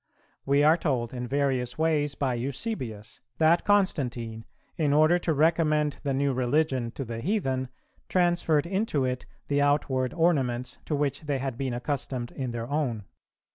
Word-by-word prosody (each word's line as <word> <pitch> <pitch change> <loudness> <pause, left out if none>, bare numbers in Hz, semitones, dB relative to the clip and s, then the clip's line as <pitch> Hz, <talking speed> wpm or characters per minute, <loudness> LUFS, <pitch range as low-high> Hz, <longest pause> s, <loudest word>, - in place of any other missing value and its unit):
We 140 +1 +4
are 155 +3 +6
told 130 -8 -1
in 125 -1 -4
various 130 -2 0
ways 150 -3 +1
by 135 -3 0
Eusebius,[373:1] 125 - -5
that 165 +2 +4
Constantine, 125 - 0 0.3
in 150 -3 +1
order 155 +4 +5
to 170 - -1
recommend 155 -1 +2
the 140 - -2
new 140 0 +1
religion 130 -1 +1
to 135 - -5
the 115 0 -5
heathen, 135 - -1 0.4
transferred 175 -4 +2
into 190 -7 0
it 125 0 -3 0.2
the 145 0 +1
outward 135 -3 +1
ornaments 135 -8 +1
to 150 - -1
which 145 -2 -1
they 145 -3 -1
had 135 -2 -3
been 130 -1 -2
accustomed 125 -1 -3
in 130 -2 -4
their 115 -1 -4
own. 135 -7 -1
140 Hz, 155 wpm, -27 LUFS, 125-155 Hz, 0.4 s, are